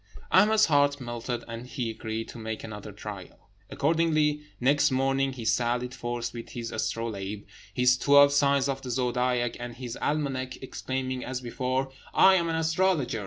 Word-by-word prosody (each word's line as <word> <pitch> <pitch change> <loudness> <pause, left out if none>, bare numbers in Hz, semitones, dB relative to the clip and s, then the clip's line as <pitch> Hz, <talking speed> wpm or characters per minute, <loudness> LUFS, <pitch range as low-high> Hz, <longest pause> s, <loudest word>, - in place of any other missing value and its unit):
Ahmed's 215 +3 +5
heart 145 -1 +3
melted, 120 -1 -4
and 115 +2 -7
he 120 -3 -3
agreed 110 0 -5
to - - -9
make 110 -1 -5
another 105 -1 -7
trial. 100 -2 -10 0.2
Accordingly, 155 -1 +1 0.2
next 145 +4 +3
morning 135 0 +1
he 120 -3 -7
sallied 120 +3 0
forth 120 -1 -4
with 115 -1 -8
his 115 -1 -6
astrolabe, 105 -3 -3 0.3
his 125 +1 +3
twelve 140 0 +6
signs 140 -1 +3
of 135 -1 -2
the 130 - -7
zodiac, 125 -1 0
and 120 -1 -6
his 125 -2 -6
almanac, 135 -4 -1
exclaiming, 130 0 -3
as 130 -1 -4
before, 130 +2 -2 0.2
"I 190 - +7
am 170 -3 +2
an 165 - 0
astrologer! 160 -6 +1
130 Hz, 160 wpm, -27 LUFS, 120-140 Hz, 0.3 s, I